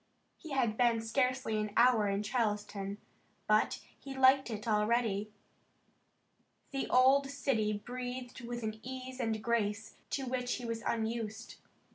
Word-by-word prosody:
He 320 Hz, -, -10 dB
had 245 Hz, -6 st, +1 dB
been 235 Hz, -2 st, +3 dB
scarcely 250 Hz, 0 st, 0 dB
an 210 Hz, -1 st, -3 dB
hour 235 Hz, -3 st, +5 dB
in 200 Hz, +1 st, 0 dB
Charleston 210 Hz, -3 st, -1 dB, 0.5 s
but 215 Hz, 0 st, +2 dB, 0.2 s
he 270 Hz, -1 st, -8 dB
liked 265 Hz, 0 st, +5 dB
it 215 Hz, 0 st, -5 dB
already. 215 Hz, -1 st, +1 dB, 1.4 s
The 275 Hz, -1 st, -2 dB
old 270 Hz, +2 st, +5 dB
city 255 Hz, -7 st, 0 dB
breathed 245 Hz, +3 st, -6 dB
with 240 Hz, 0 st, -5 dB
an 220 Hz, 0 st, -3 dB
ease 260 Hz, +1 st, -7 dB
and 220 Hz, -3 st, -1 dB
grace 220 Hz, -2 st, -1 dB
to 270 Hz, -, -2 dB
which 250 Hz, -1 st, -1 dB
he 245 Hz, -, -6 dB
was 230 Hz, -1 st, -3 dB
unused. 225 Hz, -1 st, -3 dB
235 Hz, 135 wpm, -33 LUFS, 215-255 Hz, 1.4 s, hour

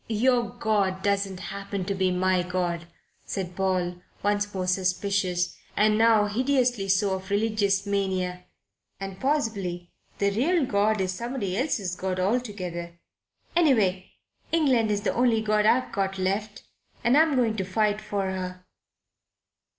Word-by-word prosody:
"Your 240 Hz, +2 st, +2 dB
God 205 Hz, -5 st, 0 dB
doesn't 200 Hz, -2 st, 0 dB
happen 200 Hz, -1 st, -4 dB
to 200 Hz, -, -1 dB
be 190 Hz, -1 st, +1 dB
my 185 Hz, 0 st, +2 dB
God," 175 Hz, -1 st, -2 dB, 0.4 s
said 180 Hz, -3 st, -4 dB
Paul, 180 Hz, -2 st, -1 dB, 0.2 s
once 205 Hz, 0 st, +1 dB
more 185 Hz, -2 st, -3 dB
suspicious 185 Hz, -1 st, 0 dB, 0.2 s
and 210 Hz, 0 st, +4 dB
now 220 Hz, -1 st, +5 dB
hideously 245 Hz, -1 st, +1 dB
so 195 Hz, +1 st, +2 dB
of 190 Hz, +1 st, -5 dB
religious 205 Hz, -1 st, +1 dB
mania. 185 Hz, -3 st, -1 dB, 0.5 s
"And 195 Hz, -1 st, -6 dB
possibly 200 Hz, -, -1 dB, 0.3 s
the 200 Hz, 0 st, +1 dB
real 290 Hz, -, +2 dB
God 210 Hz, -2 st, +1 dB
is 185 Hz, -1 st, 0 dB
somebody 235 Hz, -2 st, -3 dB
else's 205 Hz, -, -1 dB
God 185 Hz, 0 st, -3 dB
altogether. 185 Hz, -5 st, -2 dB, 0.6 s
Anyway, 215 Hz, -, +2 dB, 0.4 s
England's 240 Hz, -10 st, +2 dB
the 205 Hz, -, 0 dB
only 240 Hz, -2 st, +3 dB
God 215 Hz, -1 st, +2 dB
I've 255 Hz, +3 st, +3 dB
got 195 Hz, -1 st, -1 dB
left, 200 Hz, +2 st, -2 dB, 0.4 s
and 240 Hz, +3 st, +4 dB
I'm 310 Hz, -1 st, +4 dB
going 235 Hz, -4 st, +2 dB
to 190 Hz, -, 0 dB
fight 210 Hz, +2 st, 0 dB
for 195 Hz, -2 st, -2 dB
her." 180 Hz, -1 st, -5 dB
200 Hz, 135 wpm, -26 LUFS, 185-220 Hz, 0.6 s, now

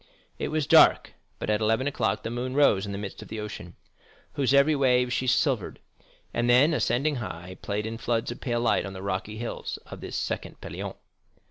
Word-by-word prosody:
It -, -, -1 dB
was 155 Hz, -1 st, -1 dB
dark, -, -, +6 dB, 0.2 s
but -, -, -2 dB
at 105 Hz, +1 st, +1 dB
eleven 110 Hz, +4 st, +2 dB
o'clock 125 Hz, -6 st, -1 dB
the 115 Hz, -, -4 dB
moon 125 Hz, +2 st, -3 dB
rose 105 Hz, -9 st, +4 dB
in -, -, -4 dB
the 100 Hz, -, -4 dB
midst 100 Hz, -1 st, -6 dB
of -, -, -10 dB
the 110 Hz, -, -6 dB
ocean, 105 Hz, -4 st, -7 dB, 0.6 s
whose 135 Hz, -2 st, +1 dB
every 140 Hz, +2 st, +5 dB
wave 125 Hz, -2 st, +3 dB
she 130 Hz, -, -1 dB
silvered, 125 Hz, -, +1 dB, 0.5 s
and 120 Hz, +1 st, 0 dB
then, 135 Hz, +7 st, +5 dB
"ascending 145 Hz, 0 st, +1 dB
high," 95 Hz, -5 st, -7 dB
played 105 Hz, +1 st, -2 dB
in 115 Hz, 0 st, -5 dB
floods 115 Hz, -1 st, -1 dB
of 120 Hz, -, -8 dB
pale 120 Hz, -2 st, -1 dB
light 120 Hz, -, +2 dB
on 95 Hz, -, -7 dB
the 95 Hz, 0 st, -8 dB
rocky 100 Hz, +2 st, -3 dB
hills 120 Hz, +1 st, -5 dB
of -, -, -10 dB
this -, -, -6 dB
second -, -, -4 dB
Pelion. -, -, -6 dB
120 Hz, 205 wpm, -27 LUFS, 105-130 Hz, 0.6 s, dark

